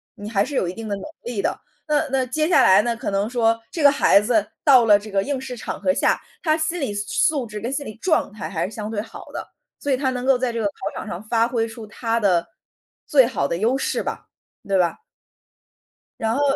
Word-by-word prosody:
你 205 +1 -7
还 200 -3 +2
是 275 +6 -5
有 185 - +1
一 175 - -3
定 225 +2 -7
的 205 - -1
能 195 - -8 0.2
力 235 -4 -3
的。 - - -2 0.3
那 300 +1 +1
那 265 -1 +1
接 305 +5 0
下 355 - +5
来 190 - +7
呢 235 -1 -1
可 230 - -4
能 200 +2 0
说， 230 -2 +2
这 320 - -3
个 285 - +8
孩 275 -7 +5
子 215 -1 +1 0.2
到 260 -5 +7
了 210 -2 +7
这 210 +1 -10
个 195 0 +1
应 280 +1 -2
试 260 -1 -7
场 - - -5
合 280 - +2
下， - - +1 0.2
他 310 -3 +2
心 330 +2 -1
理 270 -9 -2
素 205 0 -2 0.3
素 260 - -1
质 210 -1 -6
跟 235 +5 -4
心 280 +1 -3
理 215 - -7
状 315 - 0
态 210 -6 -6
还 165 -2 -2
是 195 - -6
相 215 -1 -5
对 215 -2 -2
好 225 - -11
的， - - -6 0.3
所 285 - -2
以 260 - +3
他 265 0 0
能 250 0 -4
够 265 -1 +4
在 245 -1 -1
这 230 - -2
个 220 - -1
考 - - -4 0.2
场 - - -6
上 175 -2 -5
发 230 +1 +2
挥 230 -2 -1
出 225 0 -9
他 230 +1 -2
的， 180 -6 +2 0.6
最 270 -5 +6
好 240 - -1
的 170 - -2
优 230 +8 +1
势 270 - -1
吧， - - -6 0.4
对 195 -1 +1
吧？ 175 - +1 1.2
然 225 0 0
后 285 - 0
230 Hz, 270 characters per minute, -22 LUFS, 205-265 Hz, 1.2 s, 个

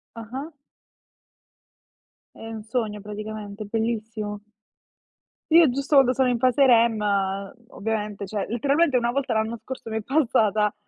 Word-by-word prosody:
Ah-ah. 255 +7 -7 1.8
È - - -11
un 225 -1 -7
sogno 220 -2 -3
praticamente, 210 0 -7
bellissimo. 220 -1 -3 1.1
Io 330 -1 +7
giusto 275 +3 -2
quando 260 -2 +6
sono 260 0 +2
in 245 -1 +1
fase 255 +3 +3
REM 230 -2 +4 0.7
ovviamente, 210 -1 -4
cioè, 200 0 -3
letteralmente 280 +5 +2
una 240 -1 +1
volta 265 -2 -1
l'anno 220 +1 -1
scorso 260 -3 -7
mi 220 - -1
è 220 - -6
passata, 215 -6 +2
225 Hz, 125 wpm, -24 LUFS, 215-255 Hz, 1.8 s, Io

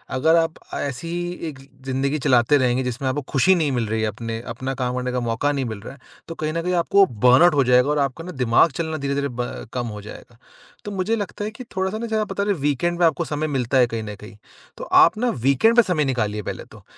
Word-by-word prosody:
अगर 160 +5 +3
आप 165 -1 +2 0.2
ऐसी 140 +4 -4
ही 175 +1 -3 0.2
एक 140 -4 -8 0.3
ज़िंदगी 135 +3 -1
चलाते 125 +3 +3
रहेंगे 130 0 +1
जिसमें 125 +2 -3
आपको 145 +3 -2
खुशी 160 +7 +4
नहीं 155 -5 0
मिल 120 -4 -1
रही 110 +1 -1
है 110 - +1
अपने 115 +2 -5
अपना 130 +3 -4
काम 125 -1 -2
करने 125 0 -2
का 125 - -1
मौका 120 +4 0
नहीं 140 -2 -2
मिल 110 -3 -5
रहा 120 - -9
है, 140 - -17 0.3
तो 165 - -7
कहीं 155 0 -3
न 165 - -1
कहीं 180 +1 -1
आपको 195 +3 +4
बर्नआउट 125 - +4
हो 140 - +4
जाएगा 125 +2 +4
और 150 - +1
आपका 140 +4 -2
ना 180 - -6
दिमाग 130 +2 +3
चलना 160 -1 -2
धीरे-धीरे 140 0 -1
ब 120 -2 -5
कम 120 -2 -2
हो 105 -1 -7
जाएगा। 115 +3 -12 0.5
तो 205 - -5
मुझे 195 +3 -1
लगता 205 -1 -4
है 215 - -4
कि 240 +4 -10
थोड़ा-सा 190 +3 -1
ना 235 - -4
ज़्यादा 220 -1 0
पता 200 0 -3
रहे 205 0 +1
वीकेंड 155 +3 -1
में 175 - +5
आपको 165 +1 +1
समय 155 0 -2
मिलता 130 -2 0
है 125 -2 +5
कहीं 115 -1 -4
न 105 -1 -7
कहीं। 105 0 -11 0.4
तो - - -7 0.2
आप - - +3
ना 245 +2 +1 0.2
वीकेंड 225 - +4
पे 240 - +8
समय 160 -7 0
निकालिए 110 -5 -1
पहले - - -5
तो। - - -15
140 Hz, 250 wpm, -22 LUFS, 125-170 Hz, 0.5 s, पे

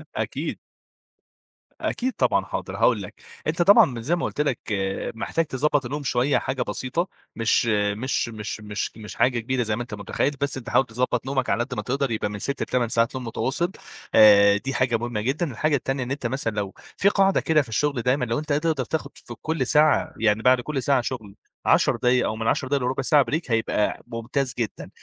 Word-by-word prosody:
أكيد. - - -3 1.2
أكيد 255 +1 -1
طبعًا، - - +1
حاضر، - - -5
هاقول - - +3
لك، - - -8 0.3
أنت - - 0
طبعًا 155 - +5
زي 150 +9 +1
ما 175 - -2
قُلت - - -2
لك، 140 -5 0 0.6
محتاج 165 +8 -1
تضبّط 145 0 0
النوم 145 +4 -4
شوية 125 +2 +2
حاجة 130 -1 -2
بسيطة، 130 - -2 0.3
مش 115 +1 +2
مش 105 +3 0
مش 110 -1 -6
مش 105 -1 -3
مش 105 -1 -9
حاجة 125 -1 +2
كبيرة 125 +2 -1
زي 110 -1 -1
ما 120 - -4
أنت 120 - -7
متخيّل، 120 +7 -1
بس 140 -1 -1
أنت 120 -3 -7
حاول 135 - +3
تضبّط 125 +1 -1
نومك 135 -1 -1
على 120 - +2
قد 130 +1 -7
ما 105 - -2
تقدر 135 +2 -1
يبقى 110 -2 -1
من 105 0 -6
6 140 +6 -3
ل8 120 -2 0
ساعات 115 +2 +1
نوم 130 -1 -4
متواصل 140 +9 -1 0.4
آآ، 100 -2 +7
دي 135 +6 -4
حاجة 120 -1 +1
مهمة 120 -2 -3
جدًا، 140 +7 -1
الحاجة 150 +5 +1
التانية 135 0 -2
إن 125 - -6
أنت 140 -3 -2
مثلًا 120 -3 -2
لو 100 -2 -3 0.2
في 200 - +4
قاعِدة 195 -1 +3
كده 155 -1 +3
في 130 - -9
الشغل 140 +3 0
دايمًا 125 +2 +1
لو 115 +2 -1
أنت 150 0 -5
قادر 150 +3 +2
تقدَر 135 -5 -2
تاخد 140 -1 -3
في 120 - -10
كلّ 155 -6 -1
ساعة، 150 0 +3
يعني 110 0 +2
بعد 125 0 +4
كلّ 135 +1 -3
ساعة 140 -3 +3
شُغل 110 -5 -6 0.3
10 - - +4
دقايق 125 +1 +2
أو 110 - -1
من 110 0 -3
10 130 - +1
دقائق 140 -1 0
لرُبع 130 +2 -1
ساعة 145 0 +4
break 160 +3 +1
هيبقى 115 -2 0
ممتاز 120 +3 -2
جدًا، 115 -3 -4
125 Hz, 210 wpm, -24 LUFS, 115-140 Hz, 1.2 s, آآ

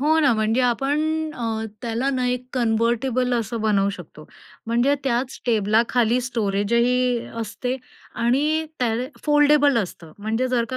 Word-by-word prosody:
हो 310 +3 +3
ना, 285 -4 +4
म्हणजे 220 +3 +1
आपण 270 +4 +1 0.3
अ, 225 -3 -3 0.2
त्याला 235 +3 -1
ना 255 -2 -1
एक 250 0 -2
कन्व्हर्टिबल 240 +1 +1
असं 230 0 -2
बनवू 200 -2 +2
शकतो. 175 -5 -11 0.4
म्हणजे 240 +5 +2
त्याच 250 0 -1
टेबलाखाली 230 +2 +2
स्टोरेजही 235 +2 +1 0.2
असते 250 +3 -3 0.4
आणि 290 +7 +1
त्याल 240 0 0 0.2
फोल्डेबल 295 -2 +4
असतं. 175 -5 -5
म्हणजे 225 +5 -1
जर 245 -2 +1
का 255 - -2
240 Hz, 135 wpm, -22 LUFS, 225-255 Hz, 0.4 s, ना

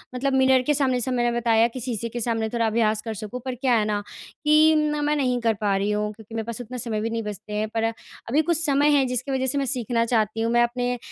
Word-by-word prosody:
मतलब 270 +2 -1
मिरर 265 -1 +4
के - - +5
सामने 265 -3 +1
जैसे 250 +1 -1
मैंने 240 -1 +1
बताया 230 -1 +3
कि 240 +2 -8
शीशे 235 -2 -3
के 240 - -5
सामने 225 -1 -1
थोड़ा 235 0 0
अभ्यास 215 -1 +1
कर 225 - -3
सकूँ। 215 +4 -6
पर 260 -1 -3
क्या 255 0 +1
है 215 - +1
ना 210 -1 -1 0.4
कि 310 +1 +5
ना 300 -1 0
मैं 295 +1 +1
नहीं 255 -4 0
कर 230 -1 +2
पा 200 -2 +1
रही 200 +2 0
हूँ 210 0 -1
क्योंकि 220 +1 -12
मेरे 225 -1 -3
पास 235 +1 -5
उतना 245 +1 -7
समय 225 -3 -3
भी 225 - -2
नहीं 230 0 -3
बचते 210 0 -7
हैं। 210 +1 -1
पर, 225 0 -2
अभी 230 +4 -2
कुछ 335 +1 +1
समय 290 0 +3
है 270 - +3
जिसकी 250 +2 -2
वजह 260 -1 0
से 265 - 0
मैं 280 - 0
सीखना 240 -3 0
चाहती 225 -2 0
हूँ। 230 +1 0
मैं 240 0 +5
अपने, 245 +1 -1
240 Hz, 270 wpm, -24 LUFS, 220-260 Hz, 0.4 s, के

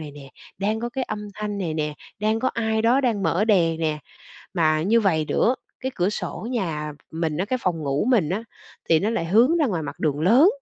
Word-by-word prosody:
này 155 -2 -7
nè, 140 -1 -12 0.3
đang 210 +3 0
có 240 - -2
cái 260 +2 -3
âm 210 -2 -5
thanh 210 -1 -4
này 170 -5 -2
nè, 150 -1 -2 0.2
đang 215 +2 +1
có 260 - +2
ai 220 -1 0
đó 240 +4 +4
đang 230 -7 0
mở 195 +2 +2
đèn 170 -7 +3
nè. 155 -2 0 0.6
Mà 155 -3 +2
như 225 +7 +3
vầy 165 -7 +2
nữa, 245 - +2 0.3
cái 260 - -2
cửa 180 +1 +1
sổ 210 - -5
nhà 160 -10 -2 0.2
mình 160 -2 -2
á, 180 - 0
cái 255 +5 -1
phòng 175 -3 0
ngủ 140 +2 0
mình 225 - +3
á, 190 +6 -2 0.5
thì 165 - +5
nó 210 - 0
lại 230 -8 -1
hướng 235 - +4
ra 310 - +3
ngoài 180 -9 -1
mặt 140 - -6
đường 150 -2 0
lớn, 235 - +6
195 Hz, 230 wpm, -24 LUFS, 160-225 Hz, 0.6 s, lớn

